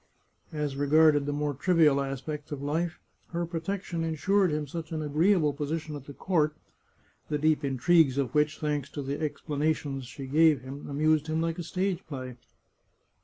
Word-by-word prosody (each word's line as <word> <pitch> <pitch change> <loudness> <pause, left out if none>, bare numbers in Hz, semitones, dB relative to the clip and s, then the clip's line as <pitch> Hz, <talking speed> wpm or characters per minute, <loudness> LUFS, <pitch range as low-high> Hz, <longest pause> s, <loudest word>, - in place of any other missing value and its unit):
As 150 -3 -2
regarded 145 0 +4
the - - 0
more 145 0 -1
trivial 150 -1 +3
aspects 140 +2 -5
of 145 - -4
life, 160 +4 -1 0.3
her 170 0 -1
protection 170 +1 -3
insured 185 +4 +2
him 150 0 -1
such 160 +2 -6
an 155 -1 -2
agreeable 155 +1 +3
position 150 +2 -3
at 140 -2 -8
the 140 - -9
court, 155 -5 +1 0.7
the 150 - 0
deep 155 0 +2
intrigues 140 +1 +3
of 135 -3 -1
which, 150 0 +2
thanks 145 -3 -2
to 145 - -4
the 140 +3 -3
explanations 145 -3 -2
she 135 +2 -8
gave 150 0 +4
him, 135 +3 -8
amused 155 +2 +2
him 155 0 0
like 165 +1 -1
a - - -3
stage 185 +2 -2
play. 130 -4 -6
150 Hz, 170 wpm, -28 LUFS, 140-165 Hz, 0.7 s, regarded